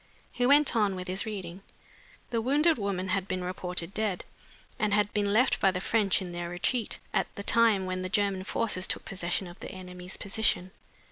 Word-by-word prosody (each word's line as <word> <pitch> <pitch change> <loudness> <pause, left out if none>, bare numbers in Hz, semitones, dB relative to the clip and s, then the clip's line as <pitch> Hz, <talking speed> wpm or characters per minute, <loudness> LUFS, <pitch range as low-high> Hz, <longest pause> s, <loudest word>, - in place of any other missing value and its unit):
He 245 0 +1
went 285 -1 +5
on 205 -4 +2
with 185 0 -6
his 190 +4 0
reading: 190 -3 -6 0.7
"'The 230 -2 +1
wounded 290 +4 +3
woman 190 -2 -2
had 190 0 0
been 185 -1 -2
reported 180 0 -3
dead, 210 -4 -1 0.5
and 210 -3 +2
had 210 0 +1
been 205 -1 +1
left 240 +5 +3
by 195 - +4
the 185 -1 -1
French 200 -1 +1
in 180 - -6
their 175 0 -4
retreat, 210 +7 -1 0.2
at - - +1
the 200 - -4
time 225 -4 +3
when 185 0 -3
the 185 - -3
German 200 -2 +1
forces 190 -2 0
took - - -1
possession 185 0 -2
of 175 +1 -11
the - - -7
enemy's 180 -1 -8
position. 200 -2 0
195 Hz, 195 wpm, -29 LUFS, 185-215 Hz, 0.7 s, went